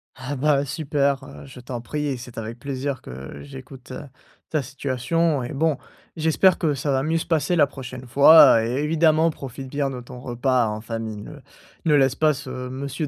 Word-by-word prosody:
Ah 135 +2 -5
bah, 140 +1 +2
super! 140 -2 -1
Heu, 140 - -11
je 130 -2 -12
t'en 125 0 -6
prie 150 +5 -3
et 135 -3 -2
c'est 120 -1 -11
avec 115 +2 -6
plaisir 135 0 -4
que 65 +2 -9
j'écoute, 135 -2 -11
heu, 130 - -6 0.5
ta 155 -2 0
situation 140 +4 -1
et 120 - -6
bon, 155 0 +1 0.4
j'espère 160 +4 +3
que 155 -4 +1
ça 140 +1 -2
va 135 -1 +1
mieux 160 +4 0
se 165 - -3
passer 165 +1 +1
la 155 -4 +5
prochaine 130 -2 -9
fois 140 -2 +7
et 115 - -2
évidemment 160 +1 +3
profite 135 -2 -8
bien 140 0 -1
de 125 -2 -6
ton 125 +1 -11
repas 125 0 0
en 105 0 -4
famille. 110 -2 -5
Ne - - -10 0.5
ne 155 - +3
laisse 135 -2 +3
pas 155 +1 +3
ce 140 0 -8 0.2
monsieur 140 +4 -4
135 Hz, 195 wpm, -23 LUFS, 125-150 Hz, 0.5 s, fois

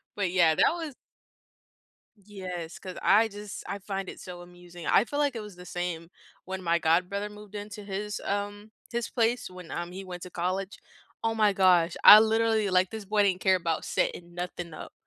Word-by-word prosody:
but, 195 -4 -1
yeah, 170 -4 +4
that - - +4
was 320 -6 -6 1.2
Yes, 185 -5 -7
'cause 185 -1 -8
I 215 +3 +5
just 205 -1 -8
I 200 - -4
find 195 -1 -4
it - - -9
so 180 -1 -9
amusing, 175 -1 -12
I 225 - +4
feel, 290 +3 -3
like, 285 -4 +1
it 225 - -4
was 210 -3 -10
the 180 0 -12
same 175 -2 -4 0.4
when 190 0 -5
my 170 -1 +2
god 170 +2 +2
brother 200 +1 -3
moved 210 0 -13
into 205 0 -7
his, 205 +1 -4
um, 205 +1 -3 0.2
his 235 -2 -2
place 240 -1 0
when, 180 -2 -11
um, 175 0 -4
he 190 +2 -7
went 180 -1 -8
to 180 - -8
college. 185 +3 -3 0.4
Oh 225 0 +1
my 210 -2 +3
gosh, 180 -3 +4
I 210 - +12
literally 220 -1 +2
like, 185 0 +3
this 220 -2 -7
boy 210 +1 +2
didn't 185 -2 +1
care 190 -1 +4
about 170 -3 -2
setting 175 0 -2
nothing 175 -1 -5
up. - - -9
190 Hz, 200 wpm, -28 LUFS, 180-210 Hz, 1.2 s, I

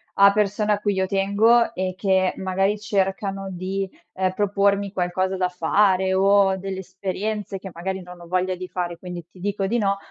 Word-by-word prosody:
a 200 0 +7
persone 210 +1 +1
a 205 - -1
cui 205 -1 0
io 190 -1 +1
tengo 205 +5 +3
e 185 0 -2
che 190 -2 +2
magari 195 +2 0
cercano 195 -1 -1
di, 190 +2 -3 0.3
ehm, 185 0 0
propormi 200 0 +1
qualcosa 185 0 -1
da 185 -1 +1
fare 190 +2 +2
o 195 0 +4
delle 190 0 -5
esperienze 195 +2 -4
che 190 - -8
magari 190 +3 -4
non 180 0 -11
ho 170 - -11
voglia 185 +1 0
di 185 0 -7
fare. 175 -2 -4
Quindi 175 -1 -7
ti 185 - -18
dico 195 +1 -1
di 235 +4 0
no, 200 -2 +1
190 Hz, 185 wpm, -23 LUFS, 185-200 Hz, 0.3 s, a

